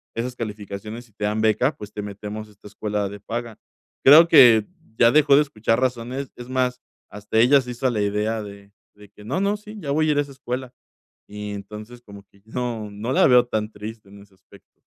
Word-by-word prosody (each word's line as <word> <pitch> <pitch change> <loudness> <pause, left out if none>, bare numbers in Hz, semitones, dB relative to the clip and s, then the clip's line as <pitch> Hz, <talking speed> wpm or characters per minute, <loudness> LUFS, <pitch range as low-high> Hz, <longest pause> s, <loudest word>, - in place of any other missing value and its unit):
esas 125 +2 -3
calificaciones 105 +1 -7
y - - -32
te 105 0 -4
dan 105 +1 -1
beca, 110 +6 +2
pues, 105 0 -9
te 105 - -5
metemos 105 +1 -7
a - - -19
esta 105 0 -16
escuela 105 -1 -3
de 100 +1 -9
paga", 115 +2 -6 0.5
creo 155 +5 +9
que, 120 -9 +7 0.3
ya 115 0 +5
dejó 145 -1 +5
de 145 - +6
escuchar 115 -4 -1
razones, 130 +1 -2
es 120 0 -10
más, 125 -1 0 0.3
hasta 105 +2 -2
ella 130 +5 +6
se 125 -1 -7
hizo 125 +2 -1
a - - +1
la 110 -3 -1
idea 105 +2 -1
de 100 0 -12 0.2
de 105 -1 -16
que: 105 +1 -17
"No, 135 +11 -2
no, 200 +1 +1
sí, 210 +1 -12
ya 145 -7 -4
voy 155 +2 +2
a - - +4
ir - - -2
a - - +4
esa 140 -1 -7
escuela", 130 -1 -6 0.6
y 105 0 -7
entonces, 105 +4 -9
como 100 -3 -13
que 100 - -26
no, 115 -2 -4
no 110 +5 -4
la - - +4
veo 125 -1 +6
tan 110 -3 -2
triste 105 0 -9
en 100 +1 -14
ese 100 -1 -21
aspecto. 95 0 -22
110 Hz, 225 wpm, -23 LUFS, 105-125 Hz, 0.6 s, creo